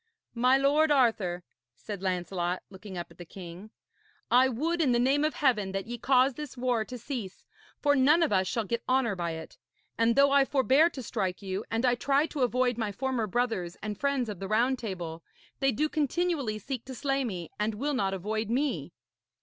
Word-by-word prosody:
'My 250 +2 +4
lord 290 +3 +3
Arthur,' 220 -11 +2 0.3
said 200 - -7
Lancelot, 180 -1 -2
looking 190 -1 -9
up 175 - -6
at - - -19
the - - -6
king, 180 +3 -10 0.6
'I 255 +2 +6
would 325 +8 -1
in 265 -6 +3
the 240 - +3
name 270 +4 +3
of 310 - 0
Heaven 215 -9 +1
that 195 0 -2
ye 240 +1 -6
cause 260 +2 +4
this 295 -1 -8
war 245 -3 +1
to 250 +3 -8
cease, 230 -6 -6 0.4
for 290 -1 +4
none 295 +5 +5
of 305 - +1
us 190 -1 +2
shall 230 +4 -1
get 235 +3 -3
honour 255 -5 +2
by 170 -2 -2
it. 160 0 -9 0.4
And 230 0 +3
though 280 0 +5
I 280 0 +6
forbear 270 +4 +4
to 265 -6 -8
strike 190 -3 -3
you 190 +2 -3
and 225 +2 0
I 245 - +4
try 275 +4 +2
to 300 -3 -5
avoid 250 -1 +1
my 215 -2 -1
former 245 +1 -1
brothers 210 -6 -1
and 210 -1 -3
friends 280 0 0
of 205 -4 -6
the 195 - -4
Round 240 +5 +2
Table, 175 -7 -5 0.4
they 270 -1 +3
do 300 +7 0
continually 300 -6 -1
seek 245 +3 -5
to 260 0 -7
slay 275 +1 0
me 180 -9 -5
and 210 +1 0
will 285 +7 -1
not 195 -7 0
avoid 215 +3 -3
me.' 235 - -1
240 Hz, 205 wpm, -29 LUFS, 195-270 Hz, 0.6 s, I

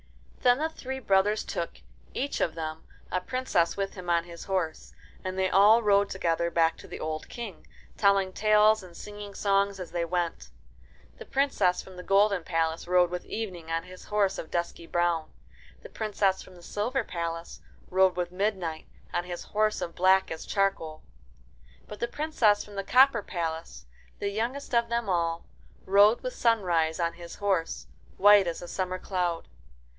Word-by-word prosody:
Then 245 0 +5
the 315 +3 -1
three 265 -4 -6
brothers 205 -3 +2
took, 170 - -3 0.4
each 280 +2 -2
of 165 - 0
them, 160 -1 -5 0.3
a 185 - 0
princess 255 -8 0
with 195 0 -2
him 180 -2 -8
on 170 -1 +3
his 170 -1 -10
horse, 185 -5 -2 0.3
and 185 0 -4
they 190 0 +2
all 210 +5 +6
rode 200 -1 +4
together 170 -2 0
back 165 -1 +2
to - - -12
the - - -8
old 155 0 -4
King, 225 -7 -8 0.3
telling 195 -2 +3
talcs 215 +1 +4
and 180 -2 -13
singing 205 -1 -9
songs 200 -1 +1
as 180 - -7
they 170 -1 -1
went. 170 - -2 0.7
The - - -8
Princess 270 -10 +1
from 190 - -13
the - - -6
golden 200 -2 +3
palace 165 -1 -1
rode 180 -1 +4
with 180 0 -5
Evening 185 -7 -5
on 165 0 -1
his 185 +1 -12
horse 205 -2 +1
of 160 - -7
dusky 170 -1 -3
brown; 175 -2 0 0.5
the - - -10
Princess 200 -3 0
from 185 - -14
the 175 - -15
silver 235 +8 -1
palace 170 -3 -5 0.3
rode 190 -1 +4
with 175 -1 -2
Midnight 185 -4 -2 0.3
on 175 - -1
his 175 -1 -6
horse 215 0 0
as 170 - -4
black 190 +2 +3
as 160 - -6
charcoal; 195 -6 -1 0.8
but 210 - -9
the 235 - 0
Princess 240 -7 +1
from 210 - -13
the 200 0 -3
copper 255 +1 +5
palace, 165 -4 -5 0.3
the 200 - -2
youngest 240 +7 -3
of 235 0 +2
them 235 -2 -1
all, 170 -2 0 0.4
rode 205 +4 +5
with - - -4
Sunrise 180 - +1
on 170 -1 0
his 170 -1 -10
horse, 195 -5 -1 0.3
white 205 -1 +7
as 170 +1 -4
a - - -7
summer 185 0 -2
cloud. 180 -3 -2
190 Hz, 175 wpm, -28 LUFS, 170-210 Hz, 0.8 s, white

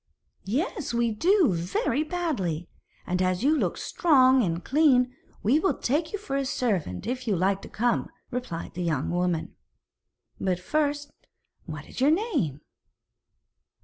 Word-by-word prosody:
'Yes, 265 - -2
we 235 -1 +2
do, 340 - +3
very 180 - 0
badly; 275 - -2 0.4
and 180 +1 -1
as 185 +3 +1
you 300 +3 +4
look - - 0
strong 265 -6 +4
and 170 -4 -1
clean, 255 -4 +3 0.3
we 255 +9 +4
will 380 - +1
take 310 +6 0
you 415 - -2
for 335 -9 -5
a 275 - +1
servant 205 - -1
if 250 +1 -3
you 210 - +2
like 190 +2 +1
to - - -10
come,' 240 +2 0 0.2
replied 240 -10 -5
the 180 - -5
young 160 -6 -1
woman. 175 -2 -1 0.8
'But, 185 -2 0
first, 290 +6 -1 0.6
what 155 -2 -6
is - - -8
your 275 - +5
name?' 310 - 0
245 Hz, 145 wpm, -26 LUFS, 180-295 Hz, 0.8 s, your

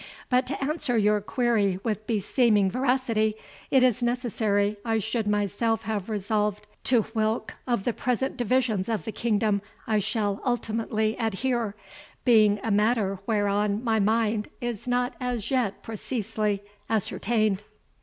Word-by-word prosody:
But 250 0 +2
to 275 - -3
answer 275 -4 0
your 210 -1 +3
query 210 -5 +1
with 215 -2 -2
beseeming 210 -2 +2
veracity, 245 -4 +1 0.3
it 265 -2 +5
is 250 -1 +3
necessary 220 -4 0
I 225 -1 +1
should 220 +1 -1
myself 210 +2 0
have 215 -2 -3
resolved 210 0 -1 0.2
to 240 -4 +4
whilk 220 0 0
of 240 -5 0
the 240 - 0
present 250 +3 -1
divisions 240 -5 +1
of 220 -3 -1
the 220 - -4
kingdom 210 -3 +1 0.2
I 215 -1 +2
shall 205 -1 -1
ultimately 225 -2 0
adhere, 225 0 -1 0.5
being 215 -4 +5
a 225 - -1
matter 205 -2 +2
whereon 205 0 +1
my 225 -2 +2
mind 215 0 +1
is 240 -2 -4
not 245 +1 +1
as 245 -3 -2
yet 240 -7 0
preceesely 215 -2 -2 0.3
ascertained." 215 -1 0
220 Hz, 135 wpm, -26 LUFS, 210-240 Hz, 0.5 s, it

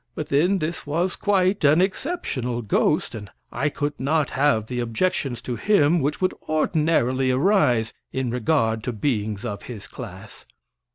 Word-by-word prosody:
But, 155 - -5
then, 175 +8 +3
this 160 -2 -4
was 170 +5 0
quite 195 -1 +1
an 150 +3 +5
exceptional 180 - -2
ghost, 105 - +1
and 105 -3 -7 0.2
I 140 +5 0
could 145 0 -3
not 145 +2 +1
have 135 -6 +2
the 125 +2 -4
objections 120 +2 -1
to 120 -2 -4
him 175 -5 +3
which 145 +1 -1
would 185 - +1 0.2
ordinarily 150 -5 +1
arise 130 - +2 0.2
in 130 -2 -2
regard 115 -3 +1
to 125 - -2
beings 110 -2 -2
of 105 -3 -4
his 110 -5 -7
class. - - -10
140 Hz, 155 wpm, -23 LUFS, 120-160 Hz, 0.2 s, an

